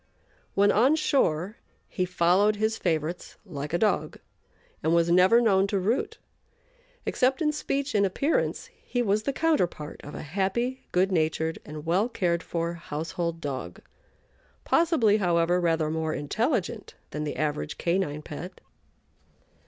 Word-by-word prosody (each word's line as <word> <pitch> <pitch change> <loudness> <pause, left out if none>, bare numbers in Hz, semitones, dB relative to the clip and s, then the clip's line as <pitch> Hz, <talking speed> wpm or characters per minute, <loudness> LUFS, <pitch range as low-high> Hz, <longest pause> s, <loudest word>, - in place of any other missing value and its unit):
When 200 +1 +5
on 255 +8 +4
shore 210 - +1 0.3
he 185 - -1
followed 180 +4 +3
his 220 +1 0
favorites 165 -2 -2
like 145 -6 -6
a 170 - +1
dog 210 0 0 0.6
and 160 +2 +2
was 170 0 +3
never 185 +6 +6
known 200 -4 +3
to 200 - -1
root. 220 +8 -1 0.9
Except 260 +1 +1
in 300 -2 +2
speech 280 -1 -2
and 205 - +3
appearance 275 - 0
he 245 -1 -1
was 210 -1 +1
the 275 - -1
counterpart 260 - -1
of 145 - -9
a - - -6
happy, 200 - -2
good 185 +2 +2
natured, 160 -1 0
and 150 0 -8
well 185 +8 +2
cared 175 -7 0
for 170 0 -3
household 165 +1 -4
dog 140 -4 -5 0.8
possibly, 310 - +3
however, 175 -2 +2
rather 165 -2 +1
more 160 0 -1
intelligent 215 - -2 0.2
than 150 - -3
the 150 - -3
average 150 0 -2
canine 170 -4 -1
pet. 165 +6 -8
180 Hz, 140 wpm, -27 LUFS, 160-220 Hz, 0.9 s, never